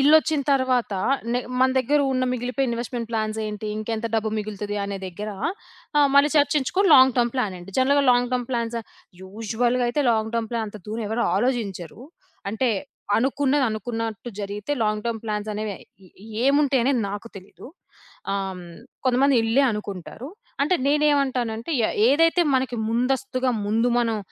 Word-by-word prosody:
ఇల్లొచ్చిన 305 +1 +4
తర్వాత 255 -5 +1 0.4
న - - 0 0.2
మన 260 0 +5
దగ్గర 285 +4 +2
ఉన్న 255 0 +1
మిగిలిపోయిన 250 +1 -1
ఇన్వెస్ట్‌మెంట్ 235 -1 -4
ప్లాన్సేంటి? 215 -1 -3
ఇంకెంత 225 +1 -3
డబ్బు 220 0 +1
మిగులుతది 210 -1 -4
అనే 200 0 -4
దగ్గర 205 +4 -6 0.7
ఆహ్, 285 -1 +5
మళ్ళీ 285 +1 +6
చర్చించుకొని 295 +7 +2
లాంగ్ 260 -1 +7
టర్మ్ 240 -1 +2
ప్లానేంటి? 195 -6 -3
జనరల్‌గా 280 +2 +4
లాంగ్ 245 0 +2
టర్మ్ 245 -1 -1
ప్లాన్స్ 235 -1 -2 0.5
యూజువల్‌గా 225 +5 -1
అయితే 285 +5 0
లాంగ్ 220 0 0
టర్మ్ 225 -1 -1
ప్లాన్, 230 -1 -1
అంత 210 - -10
దూరం 220 +1 -3
ఎవరు 230 +2 0
ఆలోచించరు. 210 -4 -2 0.5
అంటే 240 +4 0 0.5
అనుకున్నది 275 +2 +1
అనుకున్నట్టు 225 +1 -4
జరిగితే 205 +6 -4
లాంగ్ 210 0 -1
టర్మ్ 230 -2 -2
ప్లాన్సనేవి 210 0 -3 0.3
ఎ - - -18 0.4
ఏముంటయనేది 275 -2 +3
నాకు 205 +3 -6
తెలీదు. 190 +5 -12 0.7
ఆహ్, 200 0 0
హ్మ్, 180 - -10 0.4
కొంతమంది 260 +1 +3
ఇల్లే 230 +5 +3
అనుకుంటారు. 210 - -6 0.3
అంటే 365 +6 +2
నేనేమంటానంటే 275 -5 +1 0.2
ఎ - - -1 0.2
ఏదైతే 330 +5 +4
మనకి 255 -2 -1
ముందస్తుగా 255 +2 0 0.2
ముందు 225 +3 +2
మనం, 225 -2 0
235 Hz, 140 wpm, -23 LUFS, 215-265 Hz, 0.7 s, లాంగ్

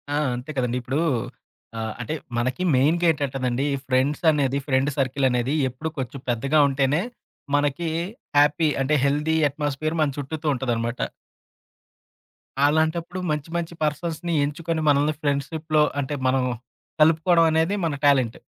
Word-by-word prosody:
ఆ! - - +1 0.2
అంతే 125 +5 -6
కదండి. 125 -1 0
ఇప్పుడూ 130 +5 -1 0.8
ఆహ్, 110 -1 -3
అంటే, 125 - -4 0.2
మనకి 130 +8 -1
మెయిన్‌గా 155 +7 +3
ఏంటంటదండి 135 -3 -2 0.2
ఫ్రెండ్స్ 130 +3 +1
అనేది 140 -3 +1
ఫ్రెండ్ 135 0 +2
సర్కిల్ 135 0 0
అనేది 125 +2 0 0.2
ఎప్పుడు 145 +6 -5
కొంచెం 130 +1 -4
పెద్దగా 135 +6 +2
ఉంటేనే, 140 +3 +1 0.5
మనకి 145 +3 0 0.5
హ్యాపీ 150 +2 +4
అంటే 135 +3 +1
హెల్దీ 150 +3 +1
ఎట్‌మాస్ఫియర్ 145 +2 -2
మన 150 - +3
చుట్టూతు 150 +2 -4
ఉంటదనమాట. 120 -2 -2 1.7
అలాంటప్పుడు 160 +4 +1
మంచి 150 +1 -3
మంచి 170 0 -4
పర్సన్స్‌ని 165 +3 -2
ఎంచుకొని 160 +2 -3
మనల్ని 145 +2 +3
ఫ్రెండ్‌షిప్‌లో 150 +2 0 0.2
అంటే, 140 +2 -4 0.2
మనం 130 0 +2 0.6
కలుపుకోడం 165 +2 +5
అనేది 160 +5 +2
మన 155 -3 -1
టాలెంట్. 130 -5 +3
145 Hz, 125 wpm, -24 LUFS, 130-160 Hz, 1.7 s, కలుపుకోడం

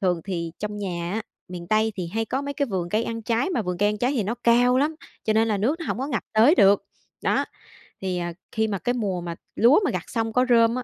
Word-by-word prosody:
Thường 180 -4 +1
thì 170 -4 -3
trong 210 0 -4
nhà 175 -3 -3
á, 220 - -2 0.3
miền 175 -1 -7
Tây 220 +1 +2
thì 180 -3 -3
hay 225 0 +1
có 265 +5 -2
mấy 285 0 -4
cái 285 -1 0
vườn 185 -6 -2
cây 215 +5 0
ăn 230 0 -4
trái, 230 - 0
mà 250 -11 0
vườn 180 -2 -3
cây 205 - +3
ăn 210 0 -2
trái 250 +5 +1
thì 250 -6 0
nó 210 +4 -2
cao 245 +2 +5
lắm, 300 +3 +1 0.3
cho 215 - +2
nên 220 +1 +3
là 210 - +1
nước 275 - 0
nó 330 - -5
hổng - - -2
có 265 - -2
ngập 255 -7 -2
tới 230 +9 +6
được. 200 - +5 0.4
Đó, - - +2 0.6
thì, 185 -2 -2
ờ, 175 - -2 0.2
khi 220 0 0
mà 205 -2 -2
cái 245 - 0
mùa 200 -7 -2
mà 170 -1 -5 0.2
lúa 240 - +6
mà - - +1
gặt - - -3
xong 225 -2 -2
có 250 +2 +3
rơm 230 -1 +5
á, 255 - -3
220 Hz, 275 wpm, -24 LUFS, 195-245 Hz, 0.6 s, tới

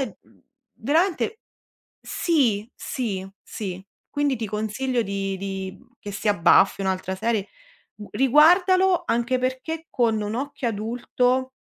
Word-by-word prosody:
uhm, 270 - -8 0.3
veramente 355 - 0 0.6
sì, 240 - +1
sì, 195 -7 -4
sì. 190 -3 -6 0.2
Quindi 290 -2 0
ti 220 -1 -3
consiglio 220 +4 -1
di 195 -1 -3
di 190 -1 -5 0.2
che 205 - -7
sia 205 +1 0
Buffy 190 +3 +4
o - - -2
un'altra 190 0 -1
serie 215 0 -1 0.5
u 210 -1 -10
riguardalo 355 - +4
anche 240 +2 +1
perché 260 +6 -3
con 225 -4 +1
un 210 +1 -3
occhio 270 0 -3
adulto, 245 +4 0
235 Hz, 125 wpm, -24 LUFS, 200-270 Hz, 0.6 s, Buffy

